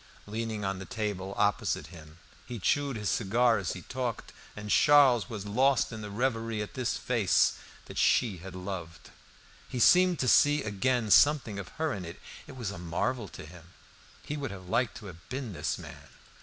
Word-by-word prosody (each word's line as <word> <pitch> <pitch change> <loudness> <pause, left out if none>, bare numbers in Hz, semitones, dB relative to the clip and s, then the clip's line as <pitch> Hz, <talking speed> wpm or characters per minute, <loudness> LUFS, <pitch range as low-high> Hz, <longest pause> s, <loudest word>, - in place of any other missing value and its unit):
Leaning 110 -1 -4
on 95 -1 -2
the 95 - -7
table 100 -3 -4
opposite 100 -1 +1
him, 80 -1 -13 0.3
he 120 - -5
chewed 140 +6 0
his 105 -2 -4
cigar 115 +3 +2
as 95 - -3
he 90 - -9
talked, 125 -3 -4 0.2
and 105 0 -6
Charles 135 -6 +5
was 105 -4 -6
lost 130 +6 +2
in 110 -1 -7
reverie 115 -2 -1
at 105 - -10
this 130 -2 -2
face 115 -7 +2 0.3
that - - -6
she 110 -7 +3
had 90 +2 -10
loved. 90 -5 -7 0.6
He 125 - -4
seemed 180 +7 +5
to 130 - -1
see 145 +4 +5
again 110 +2 0
something 135 -8 +4
of 95 - -7
her 160 -2 0
in 95 - -5
it. 85 -1 -9 0.3
It - - -11
was 115 -5 -3
a 85 - -8
marvel 100 +7 -2
to - - -10
him. 85 +2 -15 0.5
He 150 - -4
would 140 -2 -4
have 95 -3 -9
liked 120 +3 0
to 110 - -11
have 90 0 -12
been 130 -4 -5
this 80 -1 -2
man. - - -11
110 Hz, 185 wpm, -29 LUFS, 95-125 Hz, 0.6 s, Charles